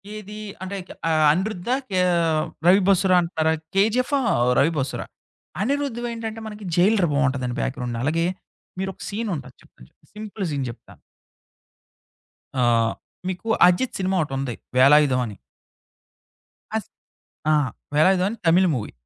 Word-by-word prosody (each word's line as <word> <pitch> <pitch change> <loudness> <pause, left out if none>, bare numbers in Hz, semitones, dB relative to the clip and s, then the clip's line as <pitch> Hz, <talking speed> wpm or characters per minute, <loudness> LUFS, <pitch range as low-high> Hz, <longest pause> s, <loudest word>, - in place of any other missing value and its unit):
ఏది? 210 0 -8 0.3
అంటే 190 +1 -5
క - - -11 0.2
ఆహ్, 155 -1 +3
అనిరుద్ధా? 190 +6 -1
కే 185 -2 +1 0.6
'రవి 190 +3 +6
బసురా' 190 -1 +4
అంటున్నారా? 160 -2 0 0.2
'కేజీఎఫ్' 225 +7 +2
ఆహ్, 245 -3 0 0.3
'రవి 150 +4 +4
బసురా,' 135 -1 -3 0.6
అనిరుధ్‌వేంటంటే 235 -4 -3
మనకి 210 -1 -9
'జైలర్' 190 -1 +4
బావుంటదండి 130 -3 0
బ్యాక్‌గ్రౌండ్. 125 -3 -3
అలాగే. 165 +4 +1 0.5
మీరొక 190 -1 -4
సీన్ 220 +2 -3
ఉంటాది, 130 -3 -9
చెప్తాను 60 - -19
చెప్ - - -31
సింపుల్ 210 -1 -6
సీన్ 140 -2 -2
చెప్తాను 115 - -13 1.6
ఆహ్, 115 -1 +3 0.3
మీకు 185 +4 -5 0.2
'అజిత్' 180 +8 +1
సినిమా 190 0 0
ఒకటుంది 135 -4 -4 0.2
'వేళాయుధం' 135 -1 +5
అని. 105 -3 -10 1.4
అస్ - - -5 0.6
ఆ! - - +5 0.4
'వెళాయుధం' 185 +4 +4
అని 230 - -6
తమిళ్ 180 +3 +5
మూవీ. 110 -4 -4
180 Hz, 125 wpm, -23 LUFS, 140-210 Hz, 1.6 s, రవి